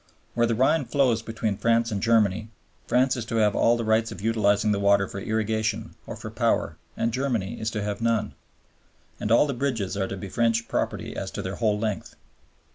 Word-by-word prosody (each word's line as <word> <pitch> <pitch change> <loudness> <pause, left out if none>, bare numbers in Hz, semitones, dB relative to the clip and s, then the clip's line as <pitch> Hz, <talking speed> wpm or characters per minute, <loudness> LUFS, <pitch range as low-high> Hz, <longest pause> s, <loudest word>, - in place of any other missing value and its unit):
Where 120 0 +2
the 115 - 0
Rhine 140 +5 +2
flows 125 -6 +2
between 110 -2 -3
France 115 +2 +2
and 100 -2 -2
Germany, 110 -2 +2 0.4
France 125 +1 +3
is 120 - -3
to 115 - -4
have 105 -2 +3
all 120 +1 +3
the 115 - -2
rights 110 +1 +1
of - - -8
utilizing 105 -1 +2
the 100 - +1
water 100 -1 +3
for 100 - -6
irrigation 110 +1 -1
or - - -5
for - - -8
power - - 0 0.2
and 115 0 0
Germany 125 -7 -2
is 110 - -1
to 105 -2 -3
have 105 +1 -3
none; 115 -2 0 0.9
and 105 - -2
all 115 - +6
the 140 - -2
bridges 120 -7 -2
are 95 -1 -1
to 100 - -5
be 95 - -6
French 115 +2 +1
property - - -2
as - - -4
to - - -5
their 95 +1 -4
whole 110 -3 +1
length. 105 -1 -3
110 Hz, 205 wpm, -25 LUFS, 105-115 Hz, 0.9 s, all